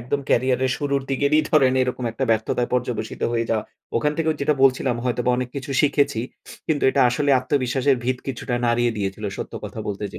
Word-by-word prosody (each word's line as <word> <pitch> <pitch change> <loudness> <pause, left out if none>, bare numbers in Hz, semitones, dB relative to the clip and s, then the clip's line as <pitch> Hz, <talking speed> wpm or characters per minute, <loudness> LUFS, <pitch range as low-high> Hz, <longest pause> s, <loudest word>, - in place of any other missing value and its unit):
একদম 125 +4 -2
ক্যারিয়ারের 130 +1 +2
শুরুর 140 -1 -1
দিকেরই 140 +3 +3
ধরেন 135 -5 +4
এরকম 125 0 -3
একটা 135 +4 -2
ব্যর্থতায় 115 +2 0
পর্যবসিত 120 -3 -3
হয়ে 115 -1 -1
যাওয়া। 110 -2 0 0.3
ওখান 150 +5 +1
থেকেও 160 -1 +1
যেটা 145 +2 +2
বলছিলাম 130 -2 +3
হয়তোবা 125 0 0
অনেক 125 0 -2
কিছু 140 +1 -5
শিখেছি। 140 -5 +2 0.5
কিন্তু 155 -3 0
এটা 140 - +1
আসলে 140 +3 0
আত্মবিশ্বাসের 130 0 +1
ভিত 125 0 0
কিছুটা 125 -1 -3
নাড়িয়ে 120 0 +2
দিয়েছিল 100 +1 -3
সত্য - - -6
কথা - - -6
বলতে 105 0 -4
যে 90 - -7
130 Hz, 185 wpm, -22 LUFS, 120-140 Hz, 0.5 s, ধরেন